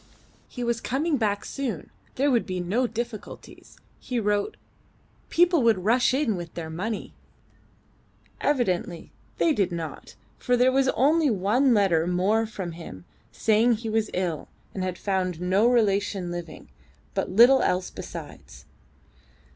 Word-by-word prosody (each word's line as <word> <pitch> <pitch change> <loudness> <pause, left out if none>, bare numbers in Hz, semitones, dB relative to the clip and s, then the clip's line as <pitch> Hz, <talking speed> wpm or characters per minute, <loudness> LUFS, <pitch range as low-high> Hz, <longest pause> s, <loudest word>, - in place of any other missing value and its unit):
"He 245 - -6
was 235 -1 -1
coming 290 +5 0
back 205 -3 -1
soon. 240 - -4 0.2
There 280 +2 +2
would 240 -3 +1
be 185 -1 -3
no 210 +9 0
difficulties," 230 -1 -8 0.2
he 250 -2 -3
wrote; 205 -1 -1 0.7
"people 345 -2 +4
would 225 -6 +3
rush 245 +4 +3
in 255 -5 +1
with 170 -2 -7
their 160 -2 -5
money." 205 +7 -4 1.3
Evidently 185 - -1 0.3
they 325 - +3
did 195 -8 0
not, 165 -2 -6 0.2
for 250 -1 +1
there 250 +1 +4
was 270 0 +2
only 300 +3 +3
one 230 +5 +2
letter 175 -5 +2
more 200 +5 +1
from 190 -5 -6
him 130 - -10 0.3
saying 225 +2 +3
he 225 0 -4
was 220 -1 0
ill, 175 -4 -2 0.3
had 185 -2 -3
found 185 -4 -1
no 190 +5 +2
relation 200 -6 +1
living, 175 -2 -8 0.4
but - - -2
little 245 +5 +6
else 180 0 0
besides. - - -10
215 Hz, 140 wpm, -25 LUFS, 180-245 Hz, 1.3 s, little